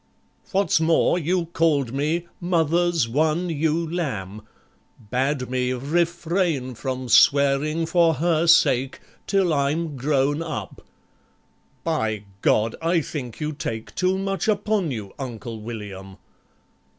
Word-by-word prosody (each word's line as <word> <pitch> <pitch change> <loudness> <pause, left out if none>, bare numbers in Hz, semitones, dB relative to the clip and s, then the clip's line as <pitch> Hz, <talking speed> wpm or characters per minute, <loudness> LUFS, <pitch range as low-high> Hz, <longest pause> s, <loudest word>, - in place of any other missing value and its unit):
What's 195 -3 +2
more, 165 +2 +3
you 175 +2 0
called 145 -7 +1
me 155 +5 -1
"Mother's 170 -4 +1
one 155 +7 0
ewe 160 +2 0
lamb," 110 - -4 0.7
Bade 130 +1 0
me 125 0 -1
"refrain 165 0 0
from 130 +1 -4
swearing 140 +6 +4
for 165 -1 +3
her 165 +2 +1
sake 135 -5 +4 0.3
Till 195 -4 +2
I'm 150 +2 0
grown 140 +2 +1
up"... 160 -4 -6 1.0
By 110 -11 -1 0.2
God! 110 +1 +2
I 165 +1 +2
think 130 -6 -6
you 155 0 -2
take 115 -6 -5
Too 185 +1 +1
much 195 +1 -2
upon 210 -4 +1
you, 105 -7 -6
Uncle 120 -3 -6
William! 100 -4 -8
150 Hz, 115 wpm, -23 LUFS, 125-170 Hz, 1.0 s, swearing